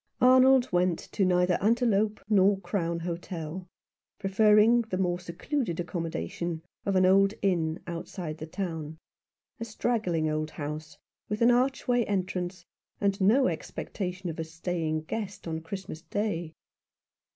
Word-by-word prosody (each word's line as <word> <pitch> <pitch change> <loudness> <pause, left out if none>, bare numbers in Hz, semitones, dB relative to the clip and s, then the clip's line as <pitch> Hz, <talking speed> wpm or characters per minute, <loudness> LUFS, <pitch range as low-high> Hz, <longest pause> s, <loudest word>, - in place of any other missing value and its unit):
Arnold 255 0 +6
went 180 -1 +2
to 200 - +1
neither 180 -1 +2
Antelope 215 -1 +2
nor 200 -2 +4
Crown 170 -3 -2
Hotel, 175 0 -5 0.5
preferring 210 +3 +5
the 220 -5 -4
more 175 -2 0
secluded 180 - -3
accommodation 170 - -3 0.2
of 195 - +1
an 185 0 +5
old 195 +2 +4
inn 165 -4 +1
outside 170 -1 -6
the 155 - -6
town, 160 -3 -4 0.6
a - - -3
straggling 215 -8 0
old 155 0 -1
house, 155 +1 -6 0.3
with 210 +2 0
an 240 - +6
archway 245 -1 +2
entrance, 185 -2 -2 0.3
and 200 0 0
no 235 +8 +5
expectation 185 -6 -4
of 165 -1 -5
a - - 0
staying 160 -1 -2
guest 200 +1 -5
on 160 0 -3
Christmas 170 -2 -7
Day. 170 -2 -3
185 Hz, 130 wpm, -28 LUFS, 165-210 Hz, 0.6 s, Arnold